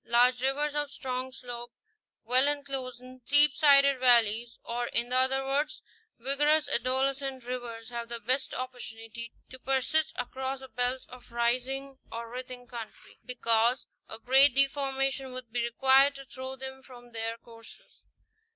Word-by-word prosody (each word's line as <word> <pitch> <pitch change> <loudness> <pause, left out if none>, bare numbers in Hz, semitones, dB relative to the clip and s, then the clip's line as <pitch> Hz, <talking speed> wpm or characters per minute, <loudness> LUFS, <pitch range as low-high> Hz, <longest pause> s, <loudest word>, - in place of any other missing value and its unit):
Large 245 +1 +3
rivers 285 +3 0
of 295 -1 -2
strong 255 0 -4
slope, 245 -2 -7 0.5
well 255 +4 +4
enclosed 275 -4 -3
in 255 0 -13
steep 290 +2 +6
sided 280 -2 +5
valleys, 235 -2 +3
or 240 +1 -2
in 240 +2 -1
other 265 +1 +2
words 285 +3 -1 0.3
vig 270 +4 -2
orous 305 +1 +3
adolescent 265 +1 0
rivers 240 -3 -6
have 235 -1 -5
the 235 0 -3
best 255 +4 -1
opportunity 235 -2 -7 0.2
to 260 - -10
persist 270 +4 0
across 265 +2 -3
a 265 - -10
belt 250 +1 -2
of 250 -1 -14
rising 255 +3 -1
or 230 0 -6
writhing 250 0 -8
country,* 235 -2 -10
because 235 0 +1 0.2
a 220 - -3
great 265 +3 +5
deformation 270 -1 0
would 255 -3 -9
be 240 0 -1
required 270 +4 +4
to 275 0 -9
throw 260 0 -7
them 265 0 -8
from 245 -2 -15
their 225 0 -3
courses. 230 -1 -16
255 Hz, 150 wpm, -29 LUFS, 240-270 Hz, 0.5 s, steep